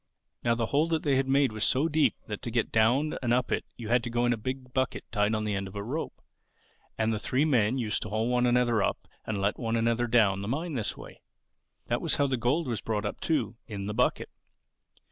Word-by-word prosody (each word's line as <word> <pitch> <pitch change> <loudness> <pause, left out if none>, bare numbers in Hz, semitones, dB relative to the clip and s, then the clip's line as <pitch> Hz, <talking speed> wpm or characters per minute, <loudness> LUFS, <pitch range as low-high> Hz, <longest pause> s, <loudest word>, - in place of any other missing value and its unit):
"Now 115 -1 +2
the 115 -1 0
hole 145 +7 +2
that 160 -2 0
they 140 -2 +2
had 135 0 +1
made 135 -1 +3
was 110 -1 -3
so 135 +8 +3
deep 155 -1 +2
that 105 -2 -5
to 120 - -4
get 115 0 0
down 125 +8 +2
and 120 -2 0
up 125 +1 +1
it - - 0
you 115 -2 -6
had 120 +1 +4
to - - -3
go 120 +1 +1
in 120 - +3
a - - 0
big 130 +3 -5
bucket 130 -1 -1
tied 105 0 +1
on 110 - -1
the 105 - -1
end 95 -1 -2
of 95 - -11
a 100 - -3
rope; 140 +9 -5 0.7
and 110 0 +1
the 105 - -2
three 130 +7 +1
men 125 -4 +2
used 110 -4 -1
to - - -4
haul 110 +2 0
one 125 0 +2
another 120 -3 +3
up - - -1 0.2
and 110 -2 -2
let 100 +1 0
one 115 -1 -1
another 115 +1 +1
down 105 -5 +3
the 100 - -4
mine 155 +8 -2
in - - -5
this 115 -6 -2
way. - - -12 0.6
That - - -1
was - - +1
how 145 - +2
the 135 -1 +1
gold 130 +7 0
was 115 -4 -2
brought 105 -2 -2
up 105 - -4
too—in 115 -10 -2
the 105 - -3
bucket. 125 +3 +1
120 Hz, 250 wpm, -28 LUFS, 110-130 Hz, 0.7 s, had